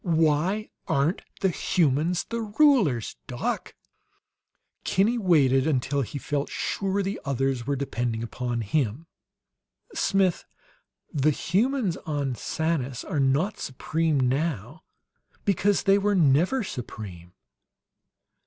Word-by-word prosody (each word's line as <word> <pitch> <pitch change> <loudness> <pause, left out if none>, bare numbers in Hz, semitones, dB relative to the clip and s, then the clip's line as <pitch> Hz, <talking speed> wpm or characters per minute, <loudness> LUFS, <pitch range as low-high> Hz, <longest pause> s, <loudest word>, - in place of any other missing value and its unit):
Why 165 +5 +1 0.2
aren't 140 +7 +1 0.2
the 190 - +3
humans 165 +1 +1
the 230 0 -4
rulers, 210 - +2
doc?" - - -3 1.1
Kinney 220 +6 +2
waited 145 - +4
until 140 -1 +1
he 135 +3 -4
felt 145 +1 -2
sure 195 0 -1
the 195 +2 -3
others 135 -2 -1
were 140 - +1
depending 120 -4 -2
upon 120 0 -3
him. 125 +5 -1 0.9
"Smith, 195 -3 +1 0.7
the 145 +1 +3
humans 200 - 0
on 145 -7 -2
Sanus 140 -2 -2
are 150 - -2
not 140 +9 +1
supreme 155 +3 -1
now 135 - -1 0.6
because 200 +1 +2
they 195 0 +4
were 205 0 +1
NEVER 170 - +3
supreme." 100 - -7
155 Hz, 105 wpm, -26 LUFS, 130-190 Hz, 1.1 s, waited